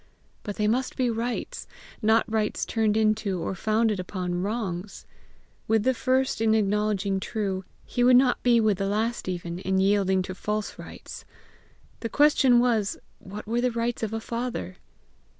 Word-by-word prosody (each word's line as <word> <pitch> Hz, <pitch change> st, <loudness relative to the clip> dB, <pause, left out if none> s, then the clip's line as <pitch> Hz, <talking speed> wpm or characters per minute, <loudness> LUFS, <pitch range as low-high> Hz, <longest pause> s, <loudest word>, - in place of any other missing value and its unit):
BUT 205 Hz, -, -5 dB
THEY 210 Hz, -, 0 dB
MUST 250 Hz, +4 st, 0 dB
BE 250 Hz, -2 st, +1 dB
RIGHTS, 230 Hz, +2 st, -4 dB, 0.3 s
not 220 Hz, +1 st, +3 dB
rights 220 Hz, -1 st, -1 dB
turned 220 Hz, -2 st, +1 dB
into, 215 Hz, -3 st, +1 dB
or 170 Hz, -, -3 dB
founded 215 Hz, +1 st, +1 dB
upon 180 Hz, -1 st, -3 dB
wrongs. 200 Hz, -2 st, -4 dB, 0.6 s
With 220 Hz, -1 st, +2 dB
the 260 Hz, -, +3 dB
first 260 Hz, -1 st, 0 dB
in 220 Hz, -1 st, +3 dB
acknowledging 205 Hz, -2 st, +1 dB
true, 195 Hz, -2 st, -3 dB, 0.2 s
he 245 Hz, -, -1 dB
would 250 Hz, +1 st, +6 dB
not 255 Hz, -1 st, +3 dB
be 240 Hz, -1 st, +4 dB
with 215 Hz, -4 st, +2 dB
the 195 Hz, -, 0 dB
last 220 Hz, +1 st, -1 dB
even, 175 Hz, -1 st, -4 dB
in 190 Hz, 0 st, -1 dB
yielding 190 Hz, -1 st, +2 dB
to 185 Hz, -, -6 dB
false 210 Hz, +2 st, -4 dB
rights! -, -, -10 dB, 0.8 s
The 230 Hz, -, -4 dB
question 275 Hz, -4 st, +5 dB
was, 230 Hz, -5 st, +1 dB, 0.2 s
what 205 Hz, +2 st, -9 dB
were 235 Hz, +3 st, 0 dB
the 250 Hz, -, +2 dB
rights 235 Hz, 0 st, -2 dB
of 220 Hz, -2 st, -2 dB
a 225 Hz, -, -2 dB
father? 230 Hz, -, -4 dB
215 Hz, 165 wpm, -26 LUFS, 195-235 Hz, 0.8 s, would